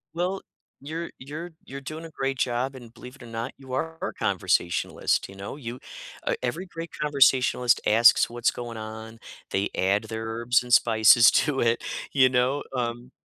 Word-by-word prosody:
Well, 185 +3 -1 0.4
you're 160 +4 -5
you're 155 +6 -7
you're 135 +1 -8
doing 155 +4 -7
a 165 - -9
great 135 -3 -3
job, 130 +2 -1
and 120 -3 -12
believe 125 +3 -12
it 130 - -14
or - - -10
not, 115 0 -5
you 135 -2 -13
are 160 +4 -2
a - - -3
conversationalist, 85 +2 0
you 100 - -12
know? 100 +5 -7
You 125 -3 -7 0.5
uh, - - +1
every 185 +3 -3
great 165 -2 -8
conversationalist 130 -4 +3
asks 115 +2 +5
what's 120 0 0
going 120 -1 -7
on. 110 +1 -8 0.3
They 95 +1 0
add 100 +3 +1
their 110 0 -5
herbs 120 +2 +1
and 120 -1 -3
spices 115 0 +6
to 145 -3 +1
it, 115 0 +2 0.3
you 130 -2 +5
know, 130 +3 +1
um, 120 0 -3
125 Hz, 175 wpm, -26 LUFS, 115-140 Hz, 0.5 s, spices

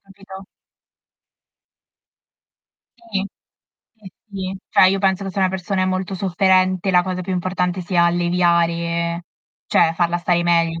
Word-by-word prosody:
capito. 195 -1 -13 2.6
Sì, 195 -1 -1 0.7
sì, 210 -4 -14 0.2
sì. 190 -1 -5
Cioè, - - +5
io 195 +1 +2
penso 190 0 +1
che 195 - -4
se 195 - -6
una 190 -1 +3
persona 190 +1 -2
è - - +2
molto 185 +1 -2
sofferente, 185 0 +1
la 180 -1 +4
cosa 185 -1 -3
più 185 +1 -4
importante 180 0 -2
sia 175 -1 +1
alleviare 170 -1 0 0.4
cioè, 165 0 +2
farla 175 0 0
stare 175 0 +1
meglio, 165 -1 +1
185 Hz, 135 wpm, -20 LUFS, 175-190 Hz, 2.6 s, Cioè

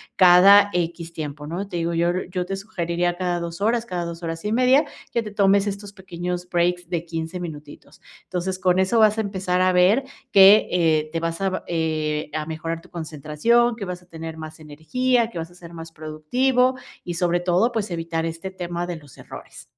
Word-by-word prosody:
cada 195 +3 +7
X 170 -1 -2
tiempo 150 -2 -6
¿No? 185 +5 -4
Te 185 - -8
digo, 170 0 -1
yo, 170 +1 +2 0.2
yo 180 -1 -2
te 195 +1 -3
sugeriría 175 -3 -2
cada 180 -2 -1
2 170 +1 -6
horas, 230 +3 +1
cada 175 -5 -3
2 170 0 -7
horas 165 +3 -5
y 210 - 0
media, 255 +5 +4 0.3
que 235 - 0
te 210 -2 -7
tomes 200 0 +3
estos 200 0 -5
pequeños 180 -2 -5
breaks 175 0 0
de 170 -2 -2
15 165 +2 -5
minutitos. 150 -3 -10 0.2
Entonces, 185 +1 -3
con 185 0 +2
eso 205 +5 +2
vas 215 0 +5
a - - +1
empezar 190 -3 -1
a 185 0 +3
ver 195 +9 +4 0.3
que, 195 +2 +7
eh, 160 -3 +2
te 165 - -2
vas 165 +2 -3
a, 190 -1 -2
eh, 155 -2 -2
a 155 -1 -2
mejorar 165 +1 -4
tu - - -19
concentración, 165 - 0
que 225 - -7
vas 180 -1 -5
a 180 - -23
tener 160 -1 -8
más 155 0 -9
energía, 230 - 0
que 175 - -9
vas 165 +1 -6
a 175 - -18
ser 170 -1 -13
más 165 0 -9
productivo 245 +13 0 0.3
y 175 - -5
sobre 175 0 +1
todo, 185 +7 +2
pues, 215 -3 -2
evitar 165 -1 -2
este 165 +3 -5
tema 175 -1 -5
de 175 - -4
los 145 -4 -14
errores. - - -11
175 Hz, 205 wpm, -23 LUFS, 165-195 Hz, 0.3 s, cada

